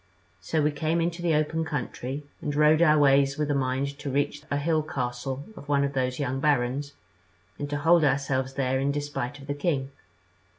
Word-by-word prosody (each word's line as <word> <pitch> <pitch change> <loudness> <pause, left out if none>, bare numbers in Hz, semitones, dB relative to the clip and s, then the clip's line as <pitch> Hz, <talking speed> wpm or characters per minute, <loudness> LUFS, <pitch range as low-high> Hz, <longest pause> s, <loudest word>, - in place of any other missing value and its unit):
So 150 - -1
we 150 - +2
came 160 +3 0
into 170 +1 -1
the 170 -3 +2
open 155 +2 0
country, 140 -2 -4 0.2
and 145 - -3
rode 150 +2 +5
our 155 -2 +6
ways 140 -1 +4
with 150 -1 -1
the - - +2
mind 140 +1 -1
to 140 - -4
reach 145 +2 -1
a 140 - 0
hill 155 +2 +1
castle 130 -1 -4
of 145 - -12
one 140 -1 +3
of 140 0 -1
those 130 -1 -1
young 135 -2 -2
barons, 140 0 0 0.7
and 145 - -3
to 145 - -1
hold 165 +3 +4
ourselves 135 -1 0
there 130 -1 0
in 140 +1 +1
despite 145 -2 -3
of 140 - -12
the 145 - -2
king. 145 -3 -1
145 Hz, 200 wpm, -27 LUFS, 135-150 Hz, 0.7 s, our